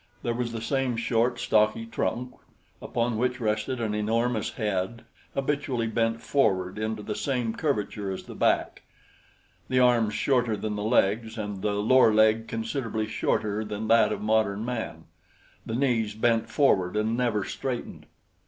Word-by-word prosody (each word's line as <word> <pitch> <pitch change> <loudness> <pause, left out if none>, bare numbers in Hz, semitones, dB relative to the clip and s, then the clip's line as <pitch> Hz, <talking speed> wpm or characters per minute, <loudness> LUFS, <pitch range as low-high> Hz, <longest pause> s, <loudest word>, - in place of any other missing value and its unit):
There 120 - 0
was 120 0 -2
the 115 -1 -5
same 130 -1 0
short, 120 +1 +1
stocky 110 +1 +2
trunk 125 +2 -3 0.5
upon 115 -1 -1
which 125 +1 0
rested 110 +3 -1
an 110 -2 -1
enormous 110 +2 0
head 105 +1 -2 0.3
habitually 135 -4 -1
bent 115 0 0
forward 95 -8 +1
into 110 -1 -3
the 105 - -3
same 125 -2 -1
curvature 105 -9 -2
as 95 - -4
the - - -10
back, - - +1 0.9
the 130 - +2
arms 120 -4 +3
shorter 125 -5 +1
than 105 0 -3
the 105 - -3
legs, 110 +1 +1
and 105 -3 -4
the 105 +1 0
lower 110 +3 +5
leg 110 +1 +3
considerably 115 -1 -2
shorter 105 0 -1
than 105 +1 -5
that 115 -1 +5
of 105 -1 -3
modern 110 -1 +1
man, 110 -9 -4 0.6
the 110 - -2
knees 115 -5 +1
bent 115 0 +1
forward 105 -8 +2
and 110 +2 +1
never 120 -5 0
straightened. 130 -3 -5
115 Hz, 155 wpm, -27 LUFS, 105-120 Hz, 0.9 s, lower